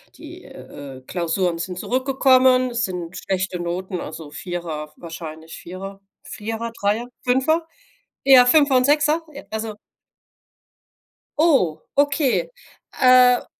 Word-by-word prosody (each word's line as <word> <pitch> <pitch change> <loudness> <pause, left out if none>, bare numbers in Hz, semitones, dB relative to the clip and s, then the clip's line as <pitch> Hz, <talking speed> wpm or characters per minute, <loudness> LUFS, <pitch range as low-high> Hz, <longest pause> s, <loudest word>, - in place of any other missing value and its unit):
die, - - -12
äh, 135 -2 -11
Klausuren 175 0 -1
sind 180 +1 -5
zurückgekommen, 255 +1 +3
es 240 0 0
sind 180 -1 -6
schlechte 190 -1 -2
Noten, 180 +1 -4
also 155 -1 -8
4er, 165 -4 -6
wahrscheinlich 160 -1 -9
4er, 195 +2 -9 0.2
4er, 225 +2 -5
3er, 210 +4 0 0.2
5er? 315 +6 +2 0.6
Eher, 260 -2 +8
5er 280 -2 +5
und 255 - +3
6er, 300 +2 +3
e 280 - -9
also 220 -1 -4 1.6
Oh, 185 - +3 0.2
okay. 290 - +2 0.5
Äh 250 -1 +6
215 Hz, 110 wpm, -21 LUFS, 175-260 Hz, 1.6 s, Eher